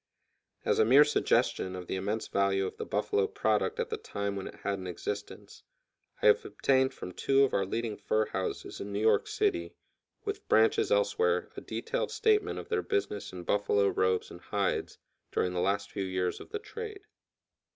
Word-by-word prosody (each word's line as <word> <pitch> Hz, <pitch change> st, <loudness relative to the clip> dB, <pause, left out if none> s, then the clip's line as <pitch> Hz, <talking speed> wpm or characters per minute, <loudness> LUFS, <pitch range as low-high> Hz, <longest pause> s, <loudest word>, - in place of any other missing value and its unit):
As -, -, +2 dB
a -, -, +7 dB
mere 130 Hz, +7 st, +8 dB
suggestion 95 Hz, -9 st, +1 dB
of 90 Hz, -1 st, -6 dB
the -, -, -4 dB
immense 105 Hz, +4 st, -2 dB
value 100 Hz, -1 st, +1 dB
of -, -, -6 dB
"the -, -, -5 dB
buffalo 100 Hz, -1 st, +1 dB
product" 110 Hz, -1 st, 0 dB
at -, -, -2 dB
the -, -, -1 dB
time 100 Hz, 0 st, -4 dB
when 95 Hz, -, -4 dB
it -, -, -9 dB
had 100 Hz, -1 st, -1 dB
an 95 Hz, -, -6 dB
existence, 105 Hz, +4 st, -6 dB, 0.6 s
I -, -, +2 dB
have 460 Hz, 0 st, +6 dB
obtained 130 Hz, -1 st, +2 dB
from 90 Hz, -, -8 dB
two 135 Hz, +8 st, +3 dB
of 135 Hz, -, +1 dB
our 95 Hz, -1 st, +1 dB
leading 115 Hz, +1 st, -2 dB
fur 110 Hz, +1 st, +1 dB
houses 95 Hz, -2 st, -4 dB
in 100 Hz, -, -5 dB
New 100 Hz, -, -2 dB
York 110 Hz, -1 st, +3 dB
City, 395 Hz, -5 st, 0 dB, 0.5 s
with 410 Hz, 0 st, -4 dB
branches 440 Hz, 0 st, +4 dB
elsewhere, 465 Hz, -2 st, +2 dB
a -, -, -6 dB
detailed -, -, -3 dB
statement 425 Hz, -1 st, +2 dB
of -, -, -7 dB
their 445 Hz, -1 st, +1 dB
business 410 Hz, -3 st, -2 dB
in 90 Hz, -1 st, -7 dB
buffalo 100 Hz, +1 st, +2 dB
robes 95 Hz, -1 st, +1 dB
and 85 Hz, -, -10 dB
hides 100 Hz, +1 st, -1 dB, 0.3 s
during 90 Hz, -, 0 dB
the 90 Hz, -, 0 dB
last 100 Hz, +2 st, 0 dB
few 100 Hz, -, -3 dB
years 95 Hz, -1 st, -1 dB
of -, -, -11 dB
the 430 Hz, -, -3 dB
trade. 430 Hz, -1 st, -7 dB
105 Hz, 190 wpm, -30 LUFS, -, 0.6 s, mere